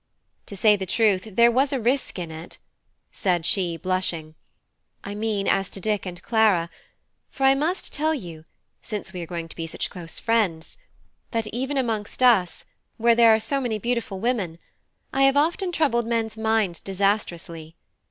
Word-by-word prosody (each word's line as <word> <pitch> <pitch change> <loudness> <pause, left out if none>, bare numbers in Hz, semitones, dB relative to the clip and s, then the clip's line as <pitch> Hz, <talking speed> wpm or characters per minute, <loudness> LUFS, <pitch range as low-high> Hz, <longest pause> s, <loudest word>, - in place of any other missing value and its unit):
To 200 - -8
say 210 +2 +5
the 190 -2 -5
truth, 215 -2 +2
there 235 +3 +5
was 265 +3 +2
a 270 - 0
risk 250 +2 0
in 170 -3 -5
it," 160 +2 -9 0.5
said 175 -4 0
she, 175 -3 +1
blushing 175 -4 -2 0.7
"I 200 - -6
mean 210 -2 -2
as 195 -1 +1
to - - -6
Dick 210 -1 -1
and 175 -1 -6
Clara; 205 -7 +2 0.6
for 270 - -5
I 270 0 +7
must 315 +7 -2
tell 310 +2 +1
you, 170 - -9 0.4
since 210 -4 -6
we 180 - -5
are 170 - -6
going 170 -1 -5
to - - -12
be 165 -1 -4
such - - -4
close 170 -4 -8
friends, 210 - -1 0.5
that 225 -2 -1
even 265 +4 -2
amongst 225 -2 -2
us, 210 -9 +3 0.3
where 235 +1 +4
there 230 -1 +6
are 220 - +4
so 275 +5 -1
many 235 -4 -1
beautiful 230 -3 -2
women, 205 -7 -1 0.6
I 270 - +1
have 270 +1 +5
often 345 +5 +1
troubled 255 -9 +1
men's 225 -2 -1
minds 220 -5 0
disastrously. 180 -5 -2
215 Hz, 170 wpm, -24 LUFS, 180-235 Hz, 0.7 s, I